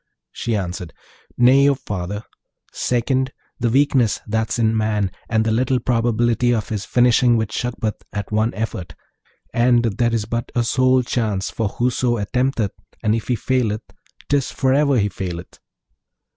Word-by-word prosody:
She 115 - -2
answered, 90 -3 -4 0.4
'Nay, 135 +3 +6
O - - +4
my - - -7
father; 100 +2 -4 0.5
second, 130 +2 0 0.3
the 120 -1 +1
weakness 130 -3 +3
that's 110 +2 -1
in 110 -1 +2
man, 105 -3 0 0.2
and 110 -1 +2
the 110 - +1
little 125 +3 +1
probability 120 0 +1
of 110 -3 -3
his 105 -2 -3
finishing 120 -1 +4
with 110 -1 -1
Shagpat 115 -3 -3
at 105 -1 -5
one 110 +2 +1
effort; 90 -7 -4 0.6
and 120 0 +3
there 115 +2 +1
is 115 -3 0
but 115 +2 -3
a 120 - +2
sole 130 +2 +3
chance 110 -6 -1
for 115 - -1
whoso 120 +2 0
attempteth, 120 0 0 0.3
and 110 -1 +2
if 115 -1 -2
he 125 - +1
faileth, 115 -3 0 0.4
'tis 140 -2 +1
forever 140 +1 +2
he 105 -2 +2
faileth.' 90 -3 -6
115 Hz, 155 wpm, -21 LUFS, 105-125 Hz, 0.6 s, Nay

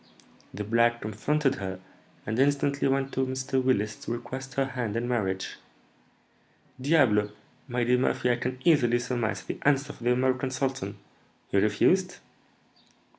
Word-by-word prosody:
The 105 - -5
black 115 +2 +2
comforted 135 +7 0
her, 95 -1 -4 0.5
and 110 +3 -2
instantly 140 0 +2
went 135 0 0
to 130 - +1
Mr. 130 0 -1
Willis 110 -5 +1
to - - -7
request 130 +2 -6
her 135 - +2
hand 125 -5 -3
in 120 +1 -1
marriage." 95 -6 -2 1.2
"Diable! 130 -9 +3 0.4
my 125 -1 -1
dear 125 +1 +3
Murphy, 125 -1 +1
I 120 - +1
can 125 +1 -3
easily 125 -8 +4
surmise 120 -2 -2
the - - -6
answer 145 0 +2
of - - -18
the 120 +1 +1
American 130 +1 +1
sultan, 130 -6 -3 0.5
he 100 - +4
refused?" 180 - +2
125 Hz, 145 wpm, -27 LUFS, 115-135 Hz, 1.2 s, easily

